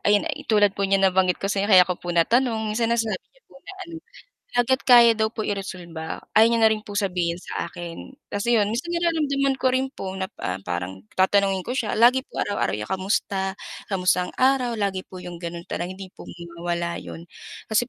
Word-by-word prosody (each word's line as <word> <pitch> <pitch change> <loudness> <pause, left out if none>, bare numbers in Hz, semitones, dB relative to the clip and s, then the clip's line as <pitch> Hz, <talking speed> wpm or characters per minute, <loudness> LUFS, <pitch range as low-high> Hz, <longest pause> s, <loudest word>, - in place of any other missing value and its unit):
ayon 205 0 +3
eh, - - -4
tulad 205 -2 +4
po 195 0 -2
n'yang 195 0 +3
nabanggit 185 -1 +3
ko 195 0 -2
sa 195 - 0
inyo 200 - -1
kaya 185 -3 +8
ko 180 -1 -4
po 175 - -8
natanong 230 +5 +2
minsan 220 +2 0
na 235 - +2
sinabi 220 -5 -1
niya - - -31
po - - -24
na - - -11
ano 335 - -11 0.6
hangga't 260 +2 +1
kaya 235 -3 +7
daw 220 0 0
po 215 - -4
i-resolba 175 -5 -5 0.2
ayaw 220 - +8
niya 230 - +2
na 220 - +7
rin 215 -1 -2
po 205 - -9
sabihin 180 -4 -1
sa - - -5
akin 170 +7 -8 0.2
kasi 205 +4 -1
'yon 210 -3 +3
minsan 260 +10 -3
nararamdaman 295 -6 +1
ko 260 - -2
rin 260 +1 +1
po 190 -8 -7
na 190 0 -4
pa 90 +1 -5
parang 90 +1 -5 0.2
tatanungin 195 0 +2
ko 245 - -4
siya, 245 -5 -1
lagi 245 +3 +5
po - - -16
araw-araw 205 - -1
niya 105 - -4
kamusta 190 - -1 0.3
kamusta 180 -2 +1
ang - - -10
araw 255 -3 +2
lagi 200 -2 -1
po 185 - -11
'yong 175 -1 -8
gano'n 170 0 -6
tanong, 185 +2 -5
hindi 195 -1 -10
po - - -13 0.3
mawala 170 0 -2
'yon. 165 - -9 0.4
Kasi 225 +3 0
200 Hz, 215 wpm, -24 LUFS, 180-235 Hz, 0.6 s, kaya